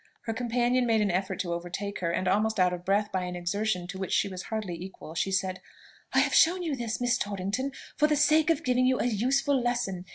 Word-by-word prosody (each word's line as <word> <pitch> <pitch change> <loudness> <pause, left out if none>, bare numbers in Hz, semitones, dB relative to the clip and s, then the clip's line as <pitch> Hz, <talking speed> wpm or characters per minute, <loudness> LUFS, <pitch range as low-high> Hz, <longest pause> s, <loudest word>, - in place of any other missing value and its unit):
Her 225 - -2
companion 245 +1 +1
made 225 -2 +3
an 205 -3 +1
effort 190 +1 -1
to 175 -2 -3
overtake 180 +4 -4
her, 170 - -1
and, 185 +2 -1
almost 215 +3 +1
out 180 -1 +4
of 175 0 -6
breath 205 +3 +1
by 185 -1 -1
an 180 0 -5
exertion 180 +1 -1
to 190 +1 -7
which 190 - -4
she - - +2
was 185 -2 -6
hardly 215 -4 -4
equal, 170 -2 -9
she 170 +4 -1
said, 190 -1 -1 0.5
"I - - +4
have - - 0
shown 355 +3 +5
you 315 -5 -1
this, 230 -3 -3
Miss 245 -1 +1
Torrington, 205 +7 -2 0.3
for 300 - +4
the 305 - +2
sake 305 +2 +4
of 330 -1 +1
giving 255 0 +2
you 255 0 +2
a - - 0
useful 260 +4 +1
lesson. 195 -7 -2
210 Hz, 235 wpm, -28 LUFS, 185-250 Hz, 0.5 s, shown